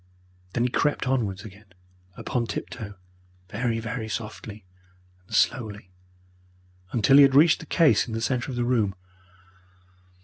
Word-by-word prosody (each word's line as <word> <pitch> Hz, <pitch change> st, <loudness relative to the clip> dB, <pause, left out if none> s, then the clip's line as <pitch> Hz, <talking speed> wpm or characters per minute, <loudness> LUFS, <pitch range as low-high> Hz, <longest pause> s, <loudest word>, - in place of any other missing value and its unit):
Then 120 Hz, -, +1 dB
he 125 Hz, -, +1 dB
crept 145 Hz, +1 st, 0 dB
onwards 105 Hz, -7 st, -1 dB
again 100 Hz, -2 st, -14 dB, 0.4 s
upon 120 Hz, -2 st, -2 dB
tiptoe, 110 Hz, -5 st, -6 dB, 0.5 s
very, 115 Hz, +2 st, -1 dB
very 115 Hz, 0 st, -5 dB
softly 110 Hz, -2 st, -7 dB, 0.6 s
and -, -, -5 dB
slowly, 105 Hz, -6 st, 0 dB, 1.0 s
until 120 Hz, +4 st, +4 dB
he -, -, +10 dB
had 135 Hz, -1 st, +6 dB
reached 160 Hz, +3 st, +6 dB
the 160 Hz, -, -11 dB
case 165 Hz, -5 st, +3 dB
in 110 Hz, -, -5 dB
the -, -, -2 dB
centre 125 Hz, +2 st, -1 dB
of 125 Hz, -, -5 dB
the 120 Hz, -, 0 dB
room. 110 Hz, -6 st, +1 dB
115 Hz, 140 wpm, -25 LUFS, 105-130 Hz, 1.0 s, he